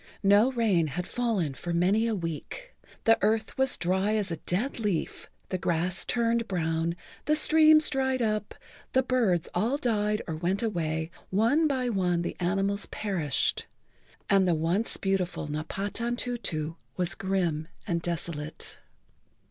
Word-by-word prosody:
No 205 Hz, +6 st, +5 dB
rain 205 Hz, -9 st, +2 dB
had 175 Hz, +5 st, -4 dB
fallen 215 Hz, -, -1 dB
for 170 Hz, +6 st, -4 dB
many 195 Hz, +7 st, +3 dB
a 225 Hz, -, 0 dB
week. 185 Hz, -, -6 dB, 0.3 s
The 225 Hz, 0 st, +5 dB
earth 215 Hz, +1 st, +1 dB
was 265 Hz, -1 st, +1 dB
dry 190 Hz, +4 st, +1 dB
as 205 Hz, -4 st, 0 dB
a 165 Hz, -, -2 dB
dead 225 Hz, -, -2 dB
leaf, 205 Hz, -7 st, -2 dB, 0.2 s
the 185 Hz, -, -2 dB
grass 175 Hz, +2 st, +1 dB
turned 230 Hz, -1 st, +1 dB
brown,[Pg 165 Hz, -2 st, -1 dB
47] -, -, -31 dB, 0.3 s
the 305 Hz, -, +3 dB
streams 310 Hz, 0 st, +6 dB
dried 265 Hz, -1 st, +1 dB
up, 215 Hz, -1 st, -1 dB, 0.4 s
the 260 Hz, -, +4 dB
birds 220 Hz, -10 st, +1 dB
all 225 Hz, +10 st, +1 dB
died 210 Hz, -5 st, 0 dB
or 160 Hz, -, -3 dB
went 185 Hz, +6 st, -1 dB
away, 160 Hz, -6 st, -1 dB, 0.2 s
one 230 Hz, +11 st, +3 dB
by 260 Hz, -3 st, 0 dB
one 180 Hz, -5 st, +1 dB
the -, -, -3 dB
animals 195 Hz, +3 st, 0 dB
perished, 175 Hz, -10 st, -1 dB, 0.6 s
and 195 Hz, -2 st, +4 dB
the 175 Hz, -, +3 dB
once 170 Hz, +8 st, +1 dB
beautiful 190 Hz, -5 st, -1 dB
Napatantutu 195 Hz, +1 st, -3 dB, 0.2 s
was 180 Hz, 0 st, 0 dB
grim 175 Hz, -5 st, -1 dB, 0.2 s
and 170 Hz, -4 st, -1 dB
desolate. 160 Hz, -2 st, -3 dB
195 Hz, 145 wpm, -28 LUFS, 170-230 Hz, 0.6 s, streams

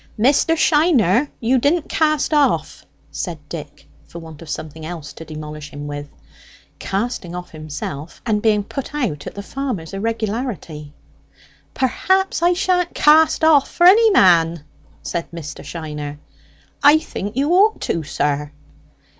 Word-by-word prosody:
"Mr. 275 Hz, +8 st, +3 dB
Shiner, 295 Hz, -, +3 dB
you 250 Hz, +3 st, +2 dB
didn't 300 Hz, +5 st, +1 dB
cast 310 Hz, 0 st, +1 dB
off," 295 Hz, -2 st, +1 dB, 0.2 s
said 175 Hz, -4 st, -4 dB
Dick, 150 Hz, -3 st, -9 dB, 0.2 s
for -, -, -11 dB
want 160 Hz, -2 st, -11 dB
of 165 Hz, -, -11 dB
something 155 Hz, +2 st, -6 dB
else 155 Hz, -4 st, -7 dB
to -, -, -10 dB
demolish 150 Hz, -1 st, -8 dB
him 145 Hz, +1 st, -8 dB
with; 145 Hz, 0 st, -6 dB, 0.7 s
casting 195 Hz, -4 st, -3 dB
off 180 Hz, 0 st, -7 dB
himself, 155 Hz, -1 st, -7 dB
and 215 Hz, -3 st, +1 dB
being 210 Hz, -2 st, +2 dB
put 275 Hz, +7 st, -6 dB
out 205 Hz, -, -2 dB
at -, -, -8 dB
the 200 Hz, -, -6 dB
farmer's 225 Hz, -, -5 dB
irregularity. 210 Hz, -, -4 dB, 0.8 s
"Perhaps 375 Hz, +9 st, +1 dB
I 350 Hz, +1 st, +4 dB
sha'n't 360 Hz, -1 st, 0 dB
cast 315 Hz, +2 st, +4 dB
off 305 Hz, -4 st, +5 dB
for 345 Hz, -, +2 dB
any 440 Hz, +5 st, +7 dB
man," 170 Hz, -, +4 dB, 0.4 s
said 170 Hz, -, -4 dB
Mr. 165 Hz, -3 st, -8 dB
Shiner. 150 Hz, -3 st, -6 dB, 0.6 s
"I 295 Hz, +2 st, +7 dB
think 210 Hz, -7 st, -6 dB
you 285 Hz, +4 st, +1 dB
ought 410 Hz, +5 st, +4 dB
to, 165 Hz, -, -1 dB
sir." 145 Hz, 0 st, -2 dB
205 Hz, 140 wpm, -20 LUFS, -, 0.8 s, any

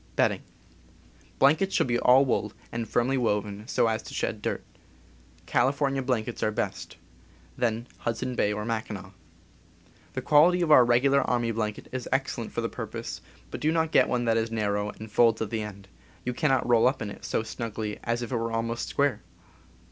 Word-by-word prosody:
Blankets 160 Hz, +8 st, +3 dB
should -, -, +3 dB
be 120 Hz, -1 st, 0 dB
all 130 Hz, +2 st, +6 dB
wool, 110 Hz, -4 st, -1 dB, 0.2 s
and 115 Hz, -1 st, -4 dB
firmly 130 Hz, +2 st, +1 dB
woven, 105 Hz, -2 st, -1 dB
so -, -, +2 dB
as 110 Hz, -1 st, 0 dB
to -, -, -9 dB
shed -, -, -2 dB
dirt. -, -, -2 dB, 0.8 s
California 135 Hz, +1 st, +1 dB
blankets 120 Hz, -3 st, -2 dB
are -, -, +2 dB
best, 110 Hz, -, -4 dB, 0.6 s
then... 115 Hz, -1 st, -1 dB
Hudson 120 Hz, +2 st, -2 dB
Bay 105 Hz, -3 st, +1 dB
or 105 Hz, 0 st, -3 dB
Mackinaw. 110 Hz, -4 st, -4 dB, 1.0 s
The -, -, -4 dB
qual 150 Hz, +3 st, +6 dB
ity 180 Hz, 0 st, +1 dB
of 160 Hz, -, +1 dB
our 130 Hz, -4 st, +9 dB
regular 130 Hz, +4 st, +4 dB
army 120 Hz, -1 st, 0 dB
blanket 110 Hz, -2 st, -3 dB
is 130 Hz, -1 st, -5 dB
ex 135 Hz, +1 st, 0 dB
cellent 115 Hz, -3 st, -5 dB
for -, -, -3 dB
the -, -, -1 dB
purpose, -, -, -6 dB, 0.3 s
but -, -, -6 dB
do 155 Hz, -, +2 dB
not 160 Hz, -1 st, +1 dB
get -, -, +4 dB
one 120 Hz, -1 st, 0 dB
that 115 Hz, -1 st, +2 dB
is 115 Hz, 0 st, 0 dB
nar 110 Hz, -2 st, -1 dB
row 105 Hz, 0 st, -1 dB
and 110 Hz, +1 st, -10 dB
folds 115 Hz, -1 st, +4 dB
at 110 Hz, -2 st, -3 dB
the 110 Hz, -2 st, -1 dB
end 100 Hz, -2 st, -8 dB, 0.2 s
— -, -, -28 dB
you 125 Hz, -, -1 dB
cannot 135 Hz, -2 st, +1 dB
roll 120 Hz, -1 st, +5 dB
up 130 Hz, -2 st, 0 dB
in 105 Hz, -, -5 dB
it -, -, -11 dB
so -, -, -1 dB
snugly 110 Hz, -2 st, -5 dB
as 120 Hz, +1 st, -1 dB
if 120 Hz, -, -6 dB
it 125 Hz, -, 0 dB
were 115 Hz, 0 st, -2 dB
almost 115 Hz, +1 st, -2 dB
square. 140 Hz, -6 st, +1 dB
115 Hz, 195 wpm, -27 LUFS, 110-130 Hz, 1.0 s, our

